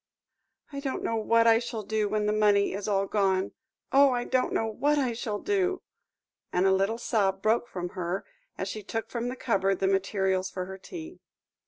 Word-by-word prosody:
"I 280 Hz, -, -4 dB
don't 275 Hz, -2 st, -3 dB
know 230 Hz, -, 0 dB
what 230 Hz, +1 st, +3 dB
I 225 Hz, 0 st, +6 dB
shall 235 Hz, -2 st, -5 dB
do 215 Hz, 0 st, -1 dB
when 210 Hz, 0 st, 0 dB
the 210 Hz, -, +1 dB
money 205 Hz, -2 st, +3 dB
is 200 Hz, +2 st, -4 dB
all 195 Hz, -1 st, +1 dB
gone. 195 Hz, -2 st, +1 dB, 0.4 s
Oh! 275 Hz, +1 st, +6 dB
I 245 Hz, -2 st, 0 dB
don't 255 Hz, 0 st, 0 dB
know 225 Hz, -, 0 dB
what 285 Hz, +7 st, +1 dB
I 260 Hz, -4 st, +1 dB
shall 225 Hz, -2 st, -3 dB
do," 380 Hz, -, 0 dB, 0.7 s
and 180 Hz, +1 st, +2 dB
a 190 Hz, -, +5 dB
little 195 Hz, +4 st, +1 dB
sob 195 Hz, -5 st, 0 dB
broke 225 Hz, +2 st, +2 dB
from 180 Hz, -4 st, -5 dB
her, 180 Hz, +1 st, -3 dB, 0.3 s
as 190 Hz, -, -3 dB
she 215 Hz, +2 st, -5 dB
took 225 Hz, +3 st, -5 dB
from 240 Hz, 0 st, -2 dB
the 250 Hz, -, -3 dB
cupboard 195 Hz, -6 st, +1 dB
the 195 Hz, -, -1 dB
materials 190 Hz, -1 st, +1 dB
for 185 Hz, -1 st, -4 dB
her 190 Hz, +1 st, -8 dB
tea. 335 Hz, -, -9 dB
215 Hz, 200 wpm, -28 LUFS, 195-240 Hz, 0.7 s, I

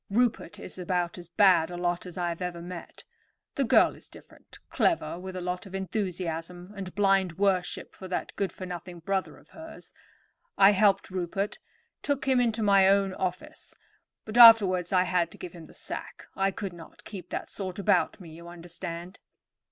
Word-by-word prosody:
Rupert 230 Hz, -4 st, 0 dB
is 185 Hz, -, -8 dB
about 180 Hz, -1 st, -2 dB
as 175 Hz, -1 st, -11 dB
bad 175 Hz, -2 st, +4 dB
a 175 Hz, -, -6 dB
lot 175 Hz, +1 st, -2 dB
as 180 Hz, -, -10 dB
I 175 Hz, -1 st, -1 dB
have 170 Hz, +1 st, -5 dB
ever 180 Hz, -1 st, -4 dB
met. 175 Hz, 0 st, -9 dB, 0.5 s
The 280 Hz, -, 0 dB
girl 235 Hz, -, +4 dB
is -, -, -13 dB
different; -, -, -16 dB
clever, 325 Hz, -, 0 dB
with 185 Hz, 0 st, -7 dB
a 185 Hz, -, -4 dB
lot 180 Hz, +2 st, -4 dB
of 195 Hz, -, -9 dB
enthusiasm 180 Hz, -2 st, -4 dB
and 190 Hz, -2 st, -7 dB
blind 195 Hz, -4 st, +2 dB
worship 195 Hz, -2 st, 0 dB
for 190 Hz, -, -10 dB
that 185 Hz, -, -4 dB
good 195 Hz, -2 st, -1 dB
for 185 Hz, -, -8 dB
nothing 175 Hz, -1 st, -8 dB
brother 190 Hz, +2 st, -2 dB
of -, -, -21 dB
hers. 320 Hz, 0 st, -12 dB, 0.6 s
I 195 Hz, 0 st, +7 dB
helped 200 Hz, -1 st, +2 dB
Rupert, 190 Hz, +2 st, -3 dB, 0.4 s
took 285 Hz, -1 st, -2 dB
him 260 Hz, -2 st, +4 dB
into 230 Hz, -2 st, 0 dB
my 195 Hz, -2 st, +5 dB
own 195 Hz, -1 st, +3 dB
office; 185 Hz, -1 st, -5 dB, 0.5 s
but 220 Hz, +2 st, -1 dB
afterwards 200 Hz, -7 st, +8 dB
I 185 Hz, -1 st, +4 dB
had 180 Hz, -2 st, 0 dB
to -, -, -13 dB
give 175 Hz, -, -8 dB
him 165 Hz, -3 st, -11 dB
the -, -, -17 dB
sack. -, -, -7 dB
I 195 Hz, 0 st, +1 dB
could 195 Hz, -1 st, -5 dB
not 165 Hz, -1 st, -14 dB
keep 185 Hz, -4 st, -9 dB
that -, -, -5 dB
sort 190 Hz, -2 st, -5 dB
about 200 Hz, +1 st, +1 dB
me, 170 Hz, -4 st, -11 dB
you 170 Hz, +2 st, -12 dB
understand." 175 Hz, +2 st, -8 dB
185 Hz, 185 wpm, -28 LUFS, 175-200 Hz, 0.6 s, afterwards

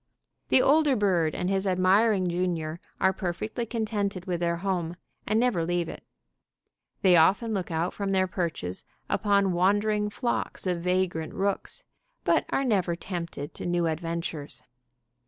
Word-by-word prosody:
The 255 Hz, -, +5 dB
older 295 Hz, -1 st, +4 dB
bird 180 Hz, -7 st, +2 dB
and 180 Hz, -, -2 dB
his 195 Hz, +1 st, 0 dB
admiring 190 Hz, +2 st, +3 dB
junior 170 Hz, -2 st, -2 dB, 0.2 s
are 190 Hz, -, +3 dB
perfectly 210 Hz, +6 st, -3 dB
contented 210 Hz, -5 st, -2 dB
with 175 Hz, -2 st, -2 dB
their 170 Hz, -1 st, 0 dB
home, 175 Hz, -2 st, -2 dB, 0.3 s
and 215 Hz, +2 st, +2 dB
never 240 Hz, -9 st, +2 dB
leave 175 Hz, 0 st, 0 dB
it. -, -, -8 dB, 1.0 s
They 185 Hz, -2 st, +6 dB
often 200 Hz, +8 st, +4 dB
look 190 Hz, -3 st, -2 dB
out 165 Hz, +2 st, -1 dB
from 200 Hz, -1 st, -3 dB
their 190 Hz, -1 st, +3 dB
perches 170 Hz, -, -3 dB, 0.3 s
upon 200 Hz, -3 st, +2 dB
wandering 205 Hz, +3 st, +2 dB
flocks 235 Hz, 0 st, -2 dB
of 180 Hz, -2 st, -1 dB
vagrant 180 Hz, -3 st, -1 dB
rooks, 200 Hz, -, -2 dB, 0.4 s
but -, -, +2 dB
are 275 Hz, -, +1 dB
never 185 Hz, -7 st, +1 dB
tempted 170 Hz, -5 st, -6 dB
to -, -, -7 dB
new 175 Hz, -1 st, +1 dB
adventures. 165 Hz, -2 st, -3 dB
185 Hz, 145 wpm, -27 LUFS, 170-205 Hz, 1.0 s, They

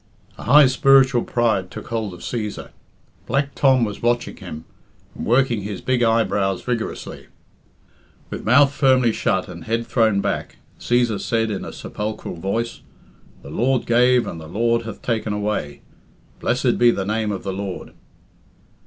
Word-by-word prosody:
A -, -, -8 dB
high 145 Hz, +5 st, +7 dB
spiritual 135 Hz, -2 st, +4 dB
pride 110 Hz, -6 st, 0 dB
took -, -, -9 dB
hold 110 Hz, -5 st, -3 dB
of 90 Hz, -, -14 dB
Cæsar 110 Hz, -4 st, -5 dB, 0.6 s
Black 140 Hz, 0 st, 0 dB
Tom 130 Hz, -3 st, +3 dB
was 105 Hz, -2 st, -6 dB
watching 120 Hz, +1 st, 0 dB
him, 75 Hz, +1 st, -9 dB, 0.5 s
and -, -, -6 dB
working 120 Hz, -2 st, +2 dB
his 100 Hz, -1 st, -5 dB
big 130 Hz, -1 st, 0 dB
eyebrows 105 Hz, -5 st, +1 dB
vigorously. 120 Hz, -3 st, -4 dB, 1.0 s
With -, -, -5 dB
mouth 135 Hz, +5 st, +5 dB
firmly 130 Hz, -4 st, +3 dB
shut 95 Hz, -3 st, -1 dB
and 85 Hz, -2 st, -10 dB
head 115 Hz, +1 st, -1 dB
thrown 110 Hz, -5 st, +2 dB
back, -, -, -3 dB, 0.2 s
Cæsar 120 Hz, -4 st, +1 dB
said 115 Hz, -1 st, 0 dB
in 100 Hz, -, -4 dB
a -, -, -7 dB
sepulchral 105 Hz, +1 st, -5 dB
voice, 115 Hz, +7 st, -3 dB, 0.6 s
"The 70 Hz, -, -10 dB
Lord 125 Hz, +7 st, +1 dB
gave, 125 Hz, +1 st, +4 dB
and 80 Hz, -, -6 dB
the 80 Hz, -, -10 dB
Lord 115 Hz, +5 st, 0 dB
hath 110 Hz, -2 st, -8 dB
taken 110 Hz, -3 st, -1 dB
away. 105 Hz, -9 st, -3 dB, 0.6 s
Blessed 125 Hz, 0 st, 0 dB
be 120 Hz, 0 st, +6 dB
the 100 Hz, -5 st, 0 dB
name 110 Hz, +1 st, -1 dB
of 100 Hz, -, -5 dB
the 95 Hz, -, -3 dB
Lord!" 95 Hz, -1 st, -6 dB
115 Hz, 155 wpm, -21 LUFS, 100-125 Hz, 1.0 s, high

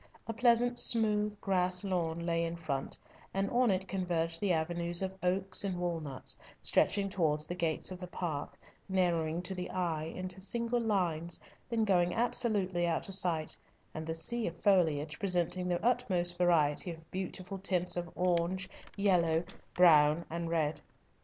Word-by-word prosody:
A 225 Hz, -, -4 dB
pleasant, 240 Hz, +1 st, +3 dB
smooth, 210 Hz, -2 st, +4 dB
grass 185 Hz, -1 st, +1 dB
lawn 170 Hz, -3 st, -2 dB
lay 170 Hz, -1 st, +1 dB
in 165 Hz, 0 st, -3 dB
front, 150 Hz, -5 st, -3 dB, 0.4 s
and 195 Hz, 0 st, 0 dB
on 245 Hz, 0 st, +3 dB
it 190 Hz, -1 st, 0 dB
converged 170 Hz, -3 st, -1 dB
the 200 Hz, -3 st, +1 dB
avenues 170 Hz, +2 st, 0 dB
of 190 Hz, 0 st, -3 dB
oaks 185 Hz, +2 st, +1 dB
and 190 Hz, -3 st, -2 dB
walnuts, 165 Hz, -6 st, -3 dB, 0.2 s
stretching 200 Hz, -1 st, +2 dB
towards 155 Hz, -5 st, 0 dB
the -, -, -4 dB
gates 170 Hz, -1 st, -1 dB
of 185 Hz, -, -7 dB
the 180 Hz, -, -7 dB
park, 165 Hz, -5 st, -4 dB, 0.3 s
narrowing 170 Hz, -3 st, 0 dB
to 185 Hz, +1 st, -4 dB
the 180 Hz, -1 st, -5 dB
eye 165 Hz, -4 st, -2 dB
into 185 Hz, +3 st, -5 dB
single 235 Hz, +4 st, -1 dB
lines, 175 Hz, -6 st, -1 dB, 0.3 s
then 230 Hz, -2 st, +1 dB
going 180 Hz, -3 st, +2 dB
absolutely 205 Hz, -7 st, +1 dB
out 170 Hz, -, -1 dB
of -, -, 0 dB
sight, 170 Hz, -5 st, +2 dB, 0.4 s
and 155 Hz, 0 st, -6 dB
the 160 Hz, -, -2 dB
sea 230 Hz, +8 st, -1 dB
of 170 Hz, -, -5 dB
foliage 160 Hz, -6 st, +2 dB
presenting 180 Hz, -1 st, 0 dB
the 175 Hz, +4 st, -1 dB
utmost 185 Hz, -8 st, +1 dB
variety 170 Hz, -2 st, +2 dB
of 165 Hz, -1 st, -10 dB
beautiful 185 Hz, +1 st, -5 dB
tints 180 Hz, -2 st, +1 dB
of 175 Hz, -1 st, -3 dB
orange, 180 Hz, +1 st, 0 dB, 0.3 s
yellow, 175 Hz, -5 st, +2 dB, 0.3 s
brown, 155 Hz, -2 st, +5 dB
and 170 Hz, 0 st, -3 dB
red. 155 Hz, -2 st, 0 dB
180 Hz, 160 wpm, -32 LUFS, 165-195 Hz, 0.4 s, brown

